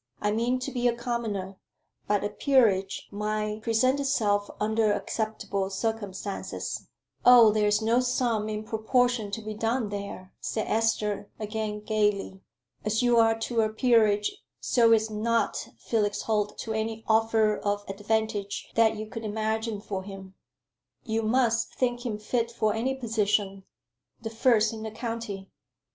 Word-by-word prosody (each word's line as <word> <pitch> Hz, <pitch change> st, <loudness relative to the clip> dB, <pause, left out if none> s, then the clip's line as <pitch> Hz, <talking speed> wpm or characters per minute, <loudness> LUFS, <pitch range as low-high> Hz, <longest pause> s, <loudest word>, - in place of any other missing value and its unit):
I 210 Hz, -, 0 dB
mean 235 Hz, +4 st, +1 dB
to 275 Hz, -, -3 dB
be 245 Hz, -2 st, +1 dB
a 235 Hz, -, +2 dB
commoner; 220 Hz, -6 st, -3 dB, 0.5 s
but 205 Hz, -1 st, +1 dB
a 205 Hz, -, 0 dB
peerage 210 Hz, -6 st, +2 dB
might 210 Hz, +1 st, -2 dB
present 250 Hz, +5 st, +2 dB
itself 210 Hz, -7 st, +1 dB
under 220 Hz, 0 st, +2 dB
acceptable 205 Hz, -2 st, -2 dB
circumstances." 200 Hz, -1 st, -4 dB, 0.4 s
"Oh, 240 Hz, -3 st, +8 dB
there 210 Hz, 0 st, +2 dB
is 210 Hz, +1 st, +2 dB
no 230 Hz, +2 st, +3 dB
sum 240 Hz, -4 st, 0 dB
in 215 Hz, 0 st, -3 dB
proportion 225 Hz, 0 st, +1 dB
to 220 Hz, +2 st, -5 dB
be 215 Hz, 0 st, -5 dB
done 225 Hz, +1 st, -1 dB
there," 200 Hz, -2 st, -6 dB
said 220 Hz, -, -2 dB
Esther, 210 Hz, -2 st, 0 dB
again 215 Hz, 0 st, -3 dB
gaily. 210 Hz, -3 st, 0 dB, 0.4 s
"As 215 Hz, +3 st, 0 dB
you 240 Hz, -1 st, +4 dB
are 225 Hz, -1 st, +4 dB
to 230 Hz, 0 st, +1 dB
a 215 Hz, -, +1 dB
peerage 215 Hz, -, +3 dB, 0.2 s
so 230 Hz, -2 st, +3 dB
is 220 Hz, -1 st, +3 dB
not 230 Hz, +2 st, 0 dB
Felix 210 Hz, -3 st, -1 dB
Holt 210 Hz, -2 st, -1 dB
to 225 Hz, -, -4 dB
any 220 Hz, 0 st, -3 dB
offer 220 Hz, -1 st, +3 dB
of 205 Hz, 0 st, -2 dB
advantage 210 Hz, 0 st, -2 dB
that 225 Hz, -1 st, +4 dB
you 215 Hz, 0 st, -5 dB
could 225 Hz, +1 st, -7 dB
imagine 220 Hz, 0 st, -2 dB
for 195 Hz, -2 st, -4 dB
him." 195 Hz, -1 st, -10 dB, 0.7 s
"You 225 Hz, -2 st, -1 dB
must 230 Hz, 0 st, +1 dB
think 245 Hz, -1 st, -1 dB
him 215 Hz, -3 st, -2 dB
fit 230 Hz, +2 st, -1 dB
for 215 Hz, -2 st, 0 dB
any 255 Hz, +4 st, -1 dB
position 210 Hz, -5 st, 0 dB, 0.5 s
the 225 Hz, -1 st, -6 dB
first 225 Hz, -1 st, +3 dB
in 220 Hz, -, -7 dB
the 220 Hz, -, -4 dB
county." 225 Hz, -3 st, -5 dB
220 Hz, 150 wpm, -27 LUFS, 210-230 Hz, 0.7 s, Oh